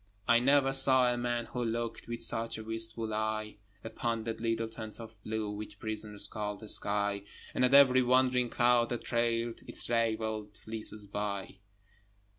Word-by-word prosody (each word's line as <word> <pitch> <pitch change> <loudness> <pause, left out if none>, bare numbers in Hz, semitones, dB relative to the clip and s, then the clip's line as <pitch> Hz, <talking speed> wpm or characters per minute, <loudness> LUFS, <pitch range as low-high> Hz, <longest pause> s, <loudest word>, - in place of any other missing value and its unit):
I 120 0 +5
never 135 +1 +3
saw 130 -2 +7
a - - -2
man 120 -1 -2
who 125 0 -4
looked 115 0 -4
With 120 0 -4
such 115 0 -2
a 110 - -7
wistful 115 0 0
eye 110 0 -3 0.3
Upon 115 0 -3
that 115 0 -5
little 115 0 -1
tent 110 -1 -9
of 115 -1 -10
blue 110 -1 -3
Which 105 +1 -8
prisoners 105 -2 0
call 105 -2 -4
the 110 +1 -11
sky, 100 0 0 0.3
And - - 0
at 125 +2 +4
every 130 -2 +7
wandering 125 0 +2
cloud 120 0 +2
that 120 - -4
trailed 115 -1 -1
Its - - 0
ravelled 110 -2 -1
fleeces 110 -1 -4
by. 100 -1 -5
115 Hz, 165 wpm, -31 LUFS, 110-120 Hz, 0.3 s, saw